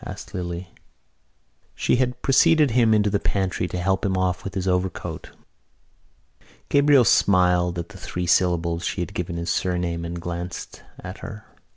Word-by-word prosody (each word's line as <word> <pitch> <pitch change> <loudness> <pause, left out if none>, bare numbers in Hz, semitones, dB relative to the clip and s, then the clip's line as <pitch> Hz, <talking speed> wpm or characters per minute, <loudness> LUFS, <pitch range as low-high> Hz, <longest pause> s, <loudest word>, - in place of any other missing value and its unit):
asked - - -9
Lily. 85 0 -4 1.1
She - - +1
had 125 -1 -1
preceded 150 +1 +4
him 115 -1 +3
into 105 -1 +3
the 100 - +1
pantry 95 -3 -1
to 90 - -5
help 95 +2 0
him 95 -2 0
off 90 -1 -1
with 100 - -6
his 95 -1 -2
overcoat. 90 0 -2 1.4
Gabriel 140 -3 +5
smiled 90 -3 +3
at 85 +2 -5
the 100 -2 -12
three 90 0 -4
syllables 85 -1 +1
she - - -2
had 95 +3 -4
given 90 -2 -4
his 85 0 -2
surname 90 -2 -1
and 85 +1 -5
glanced 85 +1 -6 0.2
at 90 +1 -8
her. 105 -2 -9
90 Hz, 160 wpm, -23 LUFS, 90-105 Hz, 1.4 s, Gabriel